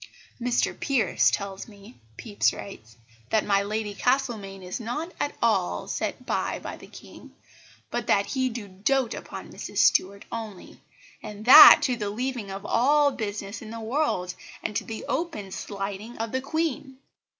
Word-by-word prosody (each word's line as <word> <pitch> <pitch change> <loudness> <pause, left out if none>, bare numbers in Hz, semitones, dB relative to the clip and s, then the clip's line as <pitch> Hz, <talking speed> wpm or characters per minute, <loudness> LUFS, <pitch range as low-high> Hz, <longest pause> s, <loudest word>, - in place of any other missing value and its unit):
"Mr 245 0 +1
Pierce 270 -5 +2
tells 195 -1 -4
me," 200 - -16 0.2
Pepys 205 -3 0
writes, 115 - -10 0.3
"that 220 - +2
my 200 -1 +3
Lady 210 +1 -3
Castlemaine 220 -6 -1
is 180 +5 -5
not 245 +9 -4
at 290 - -2
all 90 - +1
set - - -4
by - - -1
by - - -7
the - - -14
King, - - -14 0.6
but - - -3
that 200 - +3
he 260 -2 -1
do 225 -3 -7
doat 230 +6 0
upon - - -8
Mrs - - -8
Stuart 200 +2 +3
only, 220 -5 -8 0.4
and 210 +1 -9
that 300 +4 +11
to 255 -4 +1
the 210 -3 -3
leaving 240 -1 -4
of 195 +1 -7
all 285 +6 +3
business 205 -3 -5
in 220 - -9
the 230 +1 -7
world, 220 -7 -1 0.3
and 210 - -3
to - - 0
the 220 -1 -7
open 300 - -3
slighting 200 +4 -6
of 225 0 -4
the 260 - -1
Queen. 280 -2 -3
220 Hz, 160 wpm, -26 LUFS, 200-255 Hz, 0.6 s, that